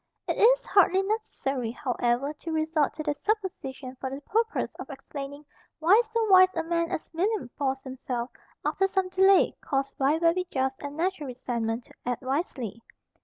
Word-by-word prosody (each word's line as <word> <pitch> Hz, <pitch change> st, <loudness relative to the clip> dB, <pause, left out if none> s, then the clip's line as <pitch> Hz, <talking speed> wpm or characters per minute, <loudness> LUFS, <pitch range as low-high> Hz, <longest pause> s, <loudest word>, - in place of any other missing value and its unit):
It -, -, 0 dB
is -, -, +5 dB
hardly 385 Hz, -1 st, +4 dB
necessary, 280 Hz, -, -2 dB
however, 245 Hz, +3 st, -1 dB
to 325 Hz, +2 st, -7 dB
resort 315 Hz, -1 st, +1 dB
to 310 Hz, -, -4 dB
that 295 Hz, -1 st, -1 dB
supposition 355 Hz, -11 st, -3 dB
for 265 Hz, -, -4 dB
the 270 Hz, +1 st, -5 dB
purpose 450 Hz, +8 st, 0 dB
of -, -, -7 dB
explaining 280 Hz, +1 st, -8 dB, 0.3 s
why 360 Hz, +8 st, +6 dB
so 455 Hz, -1 st, +1 dB
wise 370 Hz, -2 st, +8 dB
a 330 Hz, -, 0 dB
man 335 Hz, 0 st, 0 dB
as 355 Hz, -, -4 dB
William 375 Hz, -, 0 dB
forced 270 Hz, -1 st, -1 dB
himself, 255 Hz, -2 st, -4 dB, 0.3 s
after 385 Hz, -, +2 dB
some 380 Hz, -1 st, 0 dB
delay 380 Hz, +1 st, +5 dB
caused 275 Hz, 0 st, -1 dB
by 280 Hz, +3 st, +3 dB
very 340 Hz, +2 st, +2 dB
just 265 Hz, -3 st, -1 dB
and 285 Hz, +1 st, -6 dB
natural 340 Hz, -3 st, -1 dB
resentment, 235 Hz, -2 st, -3 dB
to -, -, -19 dB
act 245 Hz, +1 st, -3 dB
wisely. 255 Hz, -, -3 dB
300 Hz, 170 wpm, -27 LUFS, 265-375 Hz, 0.3 s, wise